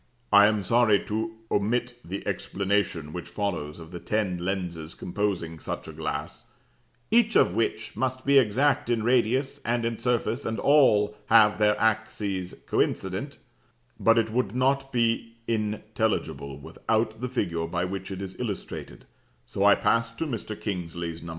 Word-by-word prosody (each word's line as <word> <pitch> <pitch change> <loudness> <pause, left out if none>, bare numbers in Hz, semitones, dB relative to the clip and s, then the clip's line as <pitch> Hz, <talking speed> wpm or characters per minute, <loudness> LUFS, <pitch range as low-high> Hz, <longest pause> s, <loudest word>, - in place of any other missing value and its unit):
"I 100 0 +9
am 105 -2 0
sorry 115 0 +3
to 110 +1 -3 0.2
omit 120 +4 0
the 95 +3 -6
explanation 95 -6 -1
which 85 -1 -6
follows 85 -6 -3
of 80 -1 -11
the 90 - -6
ten 100 -2 -1
lenses 85 -3 -3
composing 90 -4 -2
such - - -5
a - - -8
glass, - - -5 0.6
'each 230 0 +4
of - - +5
which 110 0 -1
must 130 +2 -2
be 140 0 +6
exact 135 +4 +2
in 115 -2 +1
radius 130 +4 +1
and 120 0 0
in 115 -1 -2
surface, 120 0 0
and 110 0 -2
all 105 -8 +4
have 110 -2 +5
their 105 0 +3
axes 105 -4 -1
coincident:' 95 +10 -1 0.6
but 115 0 +4
it 110 -1 +2
would 115 -2 -1
not 135 +1 +1
be 115 -1 0
intelligible 105 - -2
without 110 0 -2
the 125 - -2
figure 85 -9 -1
by 85 +1 -1
which 95 +1 -5
it 95 0 -5
is 95 -1 -7
illustrated; 100 - -5 0.4
so 100 - -2
I 100 0 +7
pass 115 0 +2
to 165 - -2
Mr. 115 -6 -5
Kingsley's 85 -4 -4
No. 85 - -8
105 Hz, 155 wpm, -26 LUFS, 95-120 Hz, 0.6 s, I